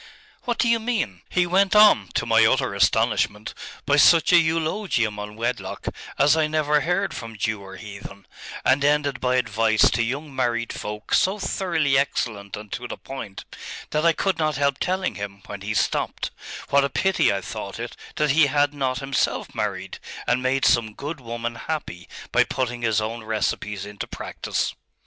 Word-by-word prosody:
'What 240 -1 -1
do 240 - +2
you 230 0 +3
mean?' 215 - -2
'He 180 -1 +2
went 190 +3 +2
on, 210 - +7
to - - +1
my - - +5
utter - - +2
astonishment, 105 +1 +1 0.3
by 145 +1 +3
such 165 +3 +6
a 170 - +9
eulogium 160 - 0
on 105 +1 -7
wedlock 120 +2 -3 0.3
as 145 +2 +5
I 160 -1 +2
never 150 -1 +2
heard 180 +2 0
from 115 -2 -7
Jew 110 0 -1
or 95 0 -10
heathen, 100 -2 -10 0.4
and 135 +2 +3
ended 145 -2 +2
by 125 0 +1
advice 115 -3 +3
to - - +1
young 135 +5 -3
married 115 -2 -1
folk 105 0 -6
so 190 +3 +3
thoroughly 160 -9 +1
excellent 105 -7 -2
and 105 -1 -10
to 125 - -4
the - - -6
point, 130 -8 -8 0.5
that 150 0 0
I 170 -1 +5
could 195 +2 -1
not 155 -2 +1
help 140 -1 +1
telling 185 +1 -1
him, 100 -1 -7
when 100 -1 -8
he 110 +2 -3
stopped; - - -1 0.4
what 140 0 +5
a 140 - 0
pity 190 +7 +2
I 100 - -1
thought - - -6
it - - -6 0.2
that 150 -2 +2
he 150 +1 +5
had 145 +1 +2
not 130 -3 -1
himself 135 -1 -1
married, - - -3 0.3
and 125 +1 +1
made 130 0 +1
some 115 -2 +3
good 145 +2 -5
woman 120 0 -4
happy 115 - -5 0.2
by - - +5
putting 125 -2 -3
his 110 -2 +2
own 110 +1 -4
recipes 105 -2 -2
into 105 0 -7
practice.... - - -3
130 Hz, 180 wpm, -24 LUFS, 110-155 Hz, 0.5 s, a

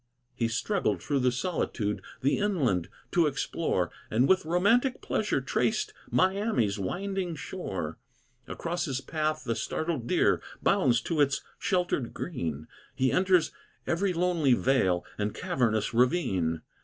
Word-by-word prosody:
He 115 - 0
struggled 180 - 0
through 145 -2 0
the 125 -1 +3
solitude 120 - -2 0.2
The 140 +8 +2
inland 140 - +1 0.2
to 170 -3 +4
explore, 145 - -1 0.2
And 120 +5 +3
with 190 -3 +3
romantic 205 - +3
pleasure - - 0
traced 425 0 0 0.2
Miami's 190 - +1
winding 185 - -2
shore. 95 - -5 0.5
Across 175 +1 -3
his 135 -4 -2
path 155 +2 -2
the 115 - -1
startled 155 0 -2
deer - - +3 0.2
Bounds 120 -2 +3
to 155 +4 0
its 140 -1 +2 0.2
shelter 180 -4 +1
green; 85 - -4 0.3
He 130 0 +2
enters 185 -2 +3 0.3
every 185 +3 +1
lonely 170 -6 +2
vale 95 -11 +2
And 105 0 -1
cavernous 110 -5 0
ravine. 115 - +1
145 Hz, 130 wpm, -28 LUFS, 115-180 Hz, 0.5 s, to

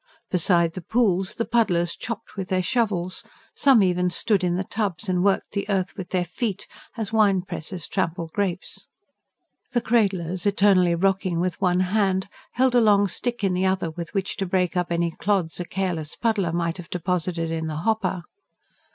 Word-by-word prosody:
Beside 170 -2 +3
the 185 - -6
pools, 195 -2 +1
the 230 - -1
puddlers 175 -8 +1
chopped 230 0 -6
with 190 -2 -5
their 185 -1 +1
shovels; 190 -6 0 0.3
some 265 -7 +5
even 180 -1 +2
stood 195 +2 +1
in 175 -1 +1
the 185 - -1
tubs, 205 -1 -3
and 180 -1 +1
worked 200 -1 +1
the 200 0 -3
earth 190 -1 0
with 190 -3 -7
their 180 -2 0
feet, 200 +2 -3 0.3
as 220 -1 -4
wine 200 -4 +3
pressers 175 -1 -5
trample 175 -3 -2
grapes. 190 -3 -3 0.9
The 240 - +3
cradlers, 190 -6 +1
eternally 195 -4 +4
rocking 190 -1 +1
with 180 +2 -2
one 180 -1 +3
hand, 190 0 +1 0.3
held 255 0 +2
a 245 - +5
long 205 -2 +4
stick 240 +4 -3
in 195 -2 +2
the 185 +1 +1
other 185 -3 0
with 170 +1 -7
which 195 -1 -2
to 195 - -2
break 180 0 0
up 180 -1 -1
any 170 0 +1
clods 185 -2 -1
a 175 - -3
careless 170 -5 -3
puddler 210 -7 0
might 170 0 -1
have 175 -2 -10
deposited 175 -1 -2
in 160 -1 -2
the 155 - -4
hopper. 195 -5 0
185 Hz, 180 wpm, -24 LUFS, 175-205 Hz, 0.9 s, some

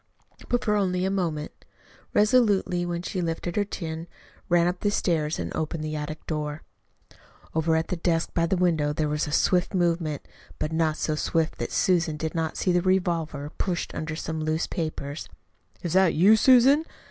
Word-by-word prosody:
But 245 - +1
for 210 - +2
only 185 -2 +1
a 190 - 0
moment. 165 -6 -2 0.6
Resolutely 210 -6 +3
then 175 0 -3
she 185 - -3
lifted 170 +1 -3
her 205 - +2
chin, 165 -4 -5 0.4
ran 175 -1 +4
up 180 +1 -1
the 205 - +1
stairs, 160 -6 0
and 85 -1 -4
opened 155 0 -3
the 155 0 -3
attic 150 +1 -5
door. 150 -1 -3 0.9
Over 160 0 +2
at 160 0 0
the - - 0
desk 165 -1 0
by 170 -1 +1
the 190 +2 +1
window 160 -5 +2
there 155 0 0
was 150 +1 -1
a - - -4
swift 180 +5 +2
movement 170 -4 0 0.3
but 155 - -2
not 160 -1 +1
so 155 - -1
swift 160 +1 -1
that - - -3
Susan 170 -4 +1
did 160 +1 -3
not 160 -2 -2
see 185 - +1
the 175 0 +3
revolver 170 -6 0
pushed 180 -3 -2
under 155 0 -4
some 160 0 -4
loose 155 +1 0
papers. 155 -3 -4 0.5
"Is 170 -2 -2
that 190 -2 +4
you, 195 +8 +6
Susan?" 260 +6 +6
165 Hz, 180 wpm, -26 LUFS, 155-185 Hz, 0.9 s, you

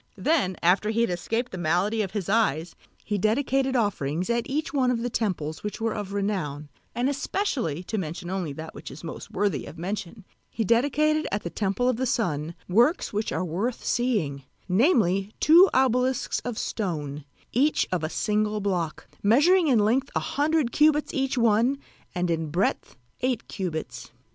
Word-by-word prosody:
Then 275 - +1
after 185 +5 +3
he 225 +1 +1
had 235 - +1
escaped 225 +8 -2
the 185 - -6
malady 180 +7 +1
of 195 - -2
his 195 -3 -4
eyes 180 -7 +1 0.3
he 210 -1 -1
dedicated 265 +5 +1
offerings 185 - 0
at 235 +3 -1
each 305 +4 -2
one 260 -3 +2
of 235 -2 0
the 245 - -2
temples 165 -9 -2
which 210 +2 -5
were 225 -1 0
of 205 -2 -5
renown, 180 -8 -2 0.3
and 245 +2 +1
especially 275 - -1
(to 215 +3 -3
mention 170 0 -5
only 185 -5 -2
that 160 +3 -8
which 145 0 -9
is 140 - -11
most 165 +4 -7
worthy 200 -8 -1
of - - -10
mention) 195 +3 -5 0.2
he 225 - -2
dedicated 290 +7 +2
at 205 - -2
the 170 - -4
temple 205 +4 0
of 255 -3 +2
the 260 +1 0
Sun 165 -9 -1
works 235 - +2
which 210 +2 -1
are 185 - -1
worth 200 +9 -3
seeing, 205 - 0 0.3
namely 195 - +2
two 345 +5 +7
obelisks 255 0 +1
of 245 -3 -5
stone, 150 -8 -3 0.3
each 285 +6 +2
of 180 -3 -1
a 155 - -1
single 210 +2 0
block, 180 -6 -2 0.2
measuring 315 - +4
in 255 -5 +4
length 235 +6 +2
a - - +3
hundred 295 -3 0
cubits 300 0 +3
each 270 -3 -1
one 235 +3 +3 0.4
and 180 -1 0
in 160 -1 -1
breadth 175 -3 -1 0.3
eight 250 -3 -1
cubits. 160 - -5
210 Hz, 175 wpm, -26 LUFS, 175-250 Hz, 0.4 s, two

